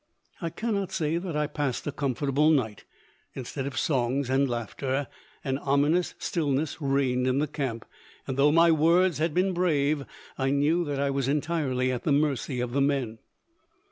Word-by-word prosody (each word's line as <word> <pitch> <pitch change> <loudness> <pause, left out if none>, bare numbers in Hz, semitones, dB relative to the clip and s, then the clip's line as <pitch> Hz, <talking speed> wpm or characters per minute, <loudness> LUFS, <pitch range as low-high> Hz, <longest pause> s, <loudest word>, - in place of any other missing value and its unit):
I 170 - -2
cannot 200 0 -2
say 160 +1 0
that 175 -3 -5
I 150 0 +1
passed 145 -3 -3
a 145 - -2
comfortable 140 +2 +1
night. 125 -9 0 0.5
Instead 135 +1 -4
of 135 -2 -6
songs 130 -1 0
and 135 +1 +2
laughter, 130 +4 -2 0.4
an 135 0 -1
ominous 145 +6 +1
stillness 150 -1 -1
reigned 135 -2 +1
in 130 +1 +1
the 145 - +2
camp, 135 -6 -4 0.4
and, 130 - -3
though 140 +2 +4
my 165 +1 +5
words 165 +1 +3
had 160 -1 0
been 185 +1 +2
brave, 150 -5 +1 0.4
I 135 0 +1
knew 145 +5 +2
that 145 -2 -3
I 140 0 +1
was 135 -1 -1
entirely 140 -4 0
at 125 - -3
the 155 - -1
mercy 140 -3 +1
of 125 -1 -3
the 140 - +2
men. 135 -6 0
140 Hz, 175 wpm, -27 LUFS, 130-155 Hz, 0.5 s, my